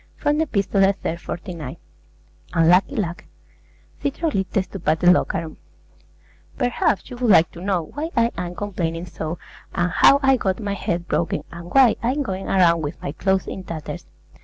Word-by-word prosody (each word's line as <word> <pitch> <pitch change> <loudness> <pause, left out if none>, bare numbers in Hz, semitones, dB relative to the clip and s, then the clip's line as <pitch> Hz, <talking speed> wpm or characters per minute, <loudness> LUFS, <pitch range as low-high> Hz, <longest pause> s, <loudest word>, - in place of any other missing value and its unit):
From 295 +1 0
the 320 - +1
'Epistolae,' 195 -3 +2
iii. 165 - 0
49. 170 -5 -7 0.8
UNLUCKY 175 - +4
LUCK 180 -6 -3 0.8
CHYTROLICTES 200 - -1
TO 195 - -7
PATELLOCHARON 165 -1 +2 1.0
Perhaps 245 -6 0
you 245 - -7
would 245 -2 0
like 170 -5 +6
to 170 - -11
know 185 -3 0
why 305 +3 -3
I 230 0 +3
am 175 0 -4
complaining 175 -4 -3
so, 165 -1 -5 0.4
and 175 +1 +1
how 275 +9 +6
I 270 -1 +5
got 190 -3 -1
my 205 -2 -2
head 175 -3 -3
broken, 170 - -1
and 170 0 -9
why 265 -4 +5
I'm 260 +5 0
going 190 -5 -4
around 170 -3 +4
with 145 -1 -5
my - - -4
clothes 190 +5 0
in 190 - -6
tatters. 165 -4 -7
190 Hz, 160 wpm, -22 LUFS, 170-230 Hz, 1.0 s, like